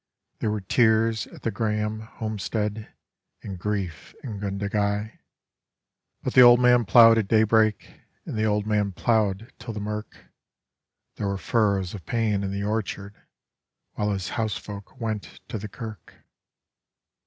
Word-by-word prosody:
There 110 - 0
were 105 -1 -2
tears 110 +2 +2
at - - -14
the 115 - 0
Grahame 105 -1 -1
homestead 110 -1 -4 0.5
and 95 -3 -6
grief 95 -6 -4
in 110 -6 -6
Gundagai; 100 +1 -2 1.0
But - - -2
the 130 - +8
old 120 0 +9
man 125 -1 +5
ploughed 115 +2 +7
at 105 - -1
daybreak 110 0 +2 0.2
and - - -5
the 110 0 +1
old 105 -1 +1
man 105 -2 0
ploughed 110 +2 0
till 115 -1 -7
the - - -3
mirk 105 +1 -5 1.0
There 100 - -2
were 100 0 -1
furrows 100 -4 +1
of 95 -6 -9
pain 110 -4 0
in 100 - -2
the 100 +1 -3
orchard 105 -1 -3 0.8
while 105 0 -2
his 95 -3 -2
housefolk 105 0 -5
went 110 -3 -4
to 110 - -4
the 105 +1 -7
kirk. 110 -1 -9
105 Hz, 140 wpm, -25 LUFS, 100-110 Hz, 1.0 s, old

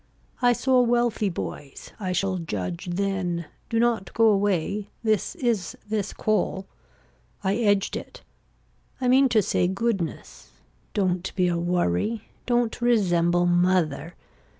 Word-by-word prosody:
I 245 -1 +5
saw 255 +1 +3
wealthy 240 -3 +1
boys. 145 -5 -7
I 185 -3 -2
shall 185 +1 0
judge 95 - -4
then. 180 -2 -1 0.2
Do 230 - 0
not 230 -6 +1
go 225 -1 +5
away. 200 0 0
This 215 -3 0
is 230 -9 -1
this 210 -2 -2
call. 195 -2 -1 0.8
I 195 +2 +1
edged 205 -4 +2
it. - - -8 0.8
I 255 - 0
mean 260 +2 +5
to 220 -3 +3
say 180 - +1
goodness. 195 -2 -3 0.5
Don't 185 -2 0
be 180 -2 +2
a 175 -1 0
worry. 175 - 0 0.2
Don't 240 -1 +1
resemble 175 -7 +3
mother. 175 -2 +1
195 Hz, 125 wpm, -25 LUFS, 175-230 Hz, 0.8 s, I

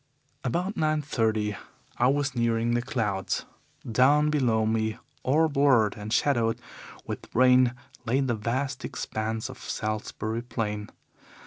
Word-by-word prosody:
"About 180 - -1
nine 155 -1 +1
thirty 110 -6 0 0.4
I 120 - +4
was 140 +1 +1
nearing 115 -1 +1
the 120 - +2
clouds. 105 -6 -2 0.4
Down 140 +6 +4
below 120 -7 +2
me, 110 0 0 0.2
all 155 +5 +3
blurred 135 -7 +3
and 105 0 -7
shadowed 115 -3 +2 0.5
with - - -6
rain, 125 0 +5 0.3
lay 125 +3 +1
the 130 -3 +1
vast 130 +5 -2
expanse 110 +1 -3
of - - -10
Salisbury 110 +1 -3
Plain. 105 -3 -3
120 Hz, 125 wpm, -27 LUFS, 110-135 Hz, 0.5 s, rain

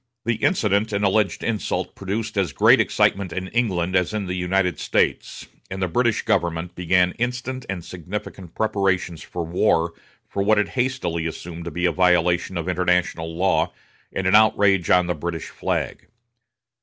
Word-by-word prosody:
The 115 -1 +1
incident 110 - +1
and 100 0 +1
alleged 100 0 +1
insult 110 -3 -2
produced 105 +3 -4
as 95 -8 0
great - - +5
excitement 95 -3 +1
in 95 +1 -4
England 95 -7 0
as 90 +3 +1
in 105 -2 -2
the 90 - -3
United 90 -1 0
States, - - -1 0.2
and 95 - -5
the 95 - 0
British 120 +6 +1
government 85 -1 0
began 90 0 +2
instant 125 +1 -3
and 90 -3 -4
significant 90 0 -7
preparations 95 -6 0
for 85 -2 -5
war 85 -1 +1 0.3
for 100 - -3
what 105 +2 +3
it 105 - +1
hastily 125 -11 -1
assumed 85 +1 -7
to - - -3
be 90 +1 -2
a 85 - +3
violation 90 +1 +2
of 85 0 -3
international 90 -2 0
law 95 +2 +2 0.4
and 95 - -3
an 95 - +2
outrage 100 -4 +4
on 90 0 +5
the 90 - -1
British 85 +1 -5
flag. - - -3
95 Hz, 165 wpm, -23 LUFS, 85-105 Hz, 0.4 s, great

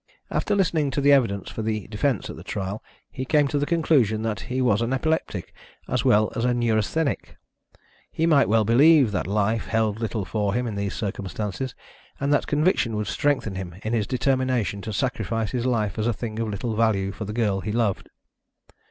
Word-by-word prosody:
After - - 0
listening 165 -7 +1
to - - +4
the 145 +1 +5
evidence 100 -8 +1
for - - -5
the 110 -2 -2
defence 110 +2 -1
at - - -7
the - - -10
trial, 100 +2 -4 0.3
he 130 - -5
came 145 +1 +3
to 145 - 0
the 145 - -1
conclusion 135 -10 +2
that 110 -2 -2
he 130 +1 -1
was 115 -4 +2
an 120 +2 0
epileptic 135 - -2 0.3
as 125 0 0
well 110 -5 +3
as 115 - -1
a 125 0 +2
neurasthenic. 120 +6 0 0.7
He 165 - 0
might 145 -7 +4
well 110 0 +3
believe 135 +2 +5
that 90 -5 -2
life 105 +2 0
held 110 -1 0
little 110 -3 -2
for 105 +1 -1
him 125 +1 0
in 115 - -3
these 100 0 -3
circumstances, 105 +3 -4 0.4
and 140 +1 +1
that 145 - +1
conviction 145 - +1
would 105 0 -1
strengthen 135 -2 0
him 95 -3 -6
in 110 - -2
his 110 -4 0
determination 130 -6 0
to 110 - -5
sacrifice 115 -1 -1
his 125 -1 -1
life 110 -5 0
as 110 - 0
a 120 - +2
thing 110 0 -5
of 115 - -1
little 110 +2 -3
value 105 -4 +1
for 105 +2 -6
the 105 - -5
girl 105 -4 +1
he 105 - -3
loved." 110 -4 -1
115 Hz, 200 wpm, -24 LUFS, 105-130 Hz, 0.7 s, the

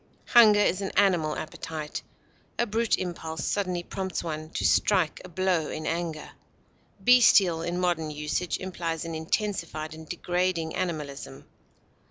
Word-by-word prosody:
Hunger 220 -4 +7
is 200 -2 +2
an 195 - -2
animal 175 -6 +3
appetite; 155 -1 -5 0.6
a 240 - +2
brute 225 +1 +1
impulse 165 -3 -4
suddenly 185 -4 -1
prompts 190 0 -4
one 155 -1 -5
to - - -3
strike 185 -6 +2
a 185 - -10
blow 180 -3 0
in 155 - -5
anger. 165 -2 -3 0.7
Bestial, 200 -9 +5
in 175 +1 -2
modern 175 -3 0
usage, 150 +3 -2
implies 170 -3 -4
an 165 - -5
intensified 160 -2 -2
and 160 0 -11
degrading 175 -2 -1
animalism. 150 - -4
170 Hz, 135 wpm, -27 LUFS, 160-190 Hz, 0.7 s, Hunger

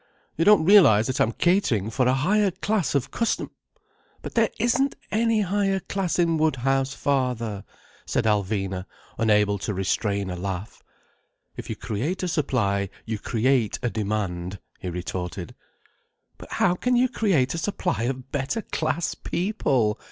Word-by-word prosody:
"You 165 - +1
don't 210 -6 +6
realize 165 - +7
that 130 +1 -1
I'm 110 - +3
catering 120 - +1
for 125 +2 +1
a 130 - +3
higher 200 +9 +2
class 190 -3 -1
of 140 - 0
custom—" 230 - -1 0.7
"But - - -6
there 230 -2 +3
isn't 250 +4 +2 0.2
any 225 0 +2
higher 195 0 +1
class 190 -2 -2
in 165 -2 +2
Woodhouse, 135 -2 +1
father," 125 -7 -1 0.4
said - - 0
Alvina, 95 -3 0 0.3
unable 105 -2 +3
to 105 +1 -3
restrain 100 +1 -1
a - - -4
laugh. 95 +2 -5 0.7
"If - - -8
you - - -2
create 140 - -3
a - - 0
supply 105 - 0 0.2
you 110 -1 -3
create 120 0 +1
a 120 - 0
demand," 100 -4 -2 0.2
he 90 - -4
retorted. 90 0 -5 0.9
"But - - -10
how 175 - +3
can 250 +7 0
you 250 +1 +4
create 185 - +1
a 165 - -3
supply 180 - -1
of 130 0 -4
better 145 - -2
class 160 +1 -1
people?" 135 - 0
130 Hz, 150 wpm, -25 LUFS, -, 0.9 s, realize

